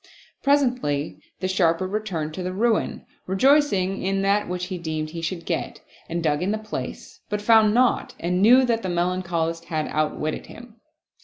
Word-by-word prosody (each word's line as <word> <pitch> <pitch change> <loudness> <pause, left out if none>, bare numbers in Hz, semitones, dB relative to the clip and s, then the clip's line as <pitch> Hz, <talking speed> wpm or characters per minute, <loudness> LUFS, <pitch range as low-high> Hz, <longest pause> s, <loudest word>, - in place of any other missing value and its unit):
Presently 250 - +1 0.2
the 185 - 0
Sharper 185 -2 +2
returned 185 -6 -3
to 185 - -5
the 180 0 -3
ruin, 225 +2 0 0.2
rejoicing 195 -3 +3
in 195 +1 0
that 200 0 +1
which 180 0 -3
he 185 -1 -5
deemed 155 -2 -3
he 165 0 -6
should 170 +1 -4
get, - - -3 0.3
and 170 0 -2
dug 150 -1 +1
in 185 - 0
the 215 - 0
place, 215 0 -7
but 210 -1 -1
found 215 0 +5
naught 250 0 +2
and 180 +2 0
knew 250 +5 +7
that 230 -2 0
the 185 - -3
Melancholist 170 -2 -1
had 155 -3 -2
outwitted 155 0 -2
him. 235 -1 -13
185 Hz, 170 wpm, -24 LUFS, 165-215 Hz, 0.3 s, knew